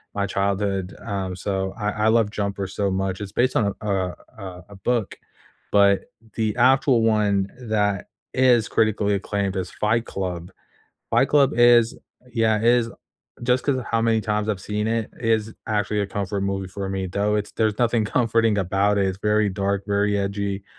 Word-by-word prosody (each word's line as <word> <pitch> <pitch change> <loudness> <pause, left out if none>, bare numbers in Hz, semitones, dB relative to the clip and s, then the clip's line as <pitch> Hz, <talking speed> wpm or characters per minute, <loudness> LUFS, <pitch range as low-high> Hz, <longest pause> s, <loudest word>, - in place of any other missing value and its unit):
my 100 0 0
childhood, 100 -1 -1
um, 95 -2 -3
so 95 0 -2
I 105 0 -1
I - - +4
love 110 -2 +3
Jumper 100 -2 -3
so 100 +1 -1
much, 95 0 -2
it's 100 -1 -7
based 125 +1 +1
on 100 -3 +1
a, - - -8
uh 95 -3 -1 0.2
uh, 95 -3 -8
a 100 - -12
book, 115 +2 -1 0.6
but 100 -1 +4 0.3
the 110 -2 0
actual 130 0 +4
one 105 -3 +2
that 105 -5 0 0.3
is 125 -4 +4
critically 105 -2 +1
acclaimed 100 -1 -2
is 95 -2 -3
Fight 115 +2 0
Club. 90 -2 -5 0.6
Fight - - +3
Club 140 -1 +4
is 120 -1 +5 0.4
Yeah, 110 -2 +2
it 110 - -4
is 120 -1 +3 0.5
just 125 +1 +2
'cause 140 -2 +1
of 125 - -5
how 115 - 0
many 115 -1 +2
times 105 0 -1
I've 100 -4 -1
seen 105 +2 -2
it, 115 -1 -1
it 120 - -3
is 110 0 0
actually 105 -1 0
a 100 - -1
comfort 100 0 -3
movie 100 -1 -2
for 95 +1 -5
me, 95 -1 -2
though 100 +3 0
it's 105 0 -3
there's 110 -2 0
nothing 120 -2 +2
comforting 115 0 +2
about 100 +2 +1
it, 100 - +2
it's 95 0 -3
very 105 0 +2
dark, 100 +1 -1
very 100 0 +1
edgy. 100 0 -2
105 Hz, 185 wpm, -23 LUFS, 100-115 Hz, 0.6 s, is